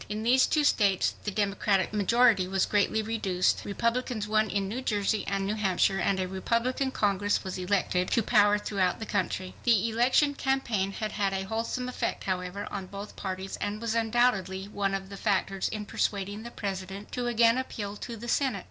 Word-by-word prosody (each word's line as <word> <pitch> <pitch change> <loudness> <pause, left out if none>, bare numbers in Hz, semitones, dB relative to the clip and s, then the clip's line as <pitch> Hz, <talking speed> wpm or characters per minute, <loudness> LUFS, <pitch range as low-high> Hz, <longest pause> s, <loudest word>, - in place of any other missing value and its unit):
In 210 +1 -3
these 255 +3 +4
two 305 - +2
states 200 -9 +3
the - - 0
Democratic 200 -1 0
majority 215 -1 +4
was 190 0 +1
greatly 210 +1 +1
reduced. 200 -5 0
Republicans 230 +1 -1
won 215 0 +2
in 200 -1 -1
New 235 +6 -4
Jersey 210 -3 0
and 195 0 -1
New 205 - -1
Hampshire 195 -2 +1
and 190 +1 +1
a 185 - -1
Republican 235 +8 0
Congress 205 -4 0
was 190 -1 -5
elected 180 -1 0
to 230 - +2
power 205 -2 +4
throughout 195 -3 0
the 220 - -5
country. 185 -2 -2
The 230 -2 +3
election 255 +5 +3
campaign 240 -9 -1
had 215 +1 -3
had 200 -2 0
a 190 0 -1
wholesome 230 +4 -3
effect, 250 - -3
however, 185 +1 -3
on 195 -2 -5
both 200 +2 -8
parties 190 0 -5
and 205 +1 -3
was 230 -1 -2
undoubtedly 220 -5 +1
one 200 -1 -1
of 195 0 -5
the 200 - -8
factors 195 -2 0
in 215 -1 -5
persuading 205 +1 -2
the 235 - -7
President 195 -2 -5
to 245 -1 -2
again 235 +1 +4
appeal 205 -5 -5
to 235 +1 -7
the 235 +2 -8
Senate. 255 -4 +1
205 Hz, 185 wpm, -28 LUFS, 195-230 Hz, -, these